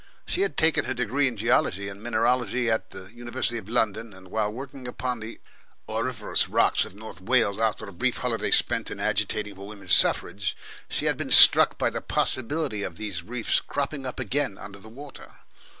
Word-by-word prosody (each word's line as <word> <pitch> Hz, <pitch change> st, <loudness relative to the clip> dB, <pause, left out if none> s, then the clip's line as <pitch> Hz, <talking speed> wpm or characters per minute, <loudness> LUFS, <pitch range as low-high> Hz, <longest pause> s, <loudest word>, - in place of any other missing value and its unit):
She 370 Hz, -, -1 dB
had 405 Hz, -, -1 dB
taken 160 Hz, -1 st, +3 dB
her 130 Hz, -, -3 dB
degree 125 Hz, +4 st, 0 dB
in 120 Hz, -3 st, -4 dB
geology 100 Hz, -3 st, +1 dB
and 100 Hz, 0 st, -9 dB
mineralogy 120 Hz, +1 st, 0 dB
in 110 Hz, 0 st, +1 dB
the 95 Hz, 0 st, -11 dB
University 120 Hz, 0 st, -4 dB
of 110 Hz, -, -14 dB
London, 115 Hz, -1 st, -1 dB
and 95 Hz, 0 st, -15 dB
while 105 Hz, +1 st, -1 dB
working 130 Hz, +2 st, -9 dB
upon 125 Hz, 0 st, -3 dB
the 110 Hz, +1 st, -9 dB, 0.5 s
auriferous 110 Hz, 0 st, -2 dB
rocks -, -, +2 dB
of -, -, -13 dB
North 105 Hz, -4 st, -10 dB
Wales, 110 Hz, -1 st, +1 dB
after 110 Hz, -1 st, -1 dB
a 100 Hz, -, -11 dB
brief 85 Hz, -, -1 dB
holiday -, -, -2 dB
spent -, -, +4 dB
in -, -, -7 dB
agitating 105 Hz, -1 st, -2 dB
for 100 Hz, +1 st, -11 dB
women's 100 Hz, -3 st, -1 dB
suffrage, 95 Hz, -3 st, +3 dB, 0.3 s
she -, -, -2 dB
had -, -, +1 dB
been -, -, -5 dB
struck -, -, +8 dB
by -, -, 0 dB
the -, -, -5 dB
possibility 130 Hz, -3 st, -2 dB
of 90 Hz, -4 st, -5 dB
these 100 Hz, -4 st, -5 dB
reefs 115 Hz, +5 st, -1 dB
cropping 140 Hz, -1 st, -4 dB
up 130 Hz, -, -6 dB
again 125 Hz, -4 st, -2 dB
under 100 Hz, 0 st, -11 dB
the 110 Hz, -, -14 dB
water. 140 Hz, +4 st, -12 dB
115 Hz, 190 wpm, -25 LUFS, 100-125 Hz, 0.5 s, struck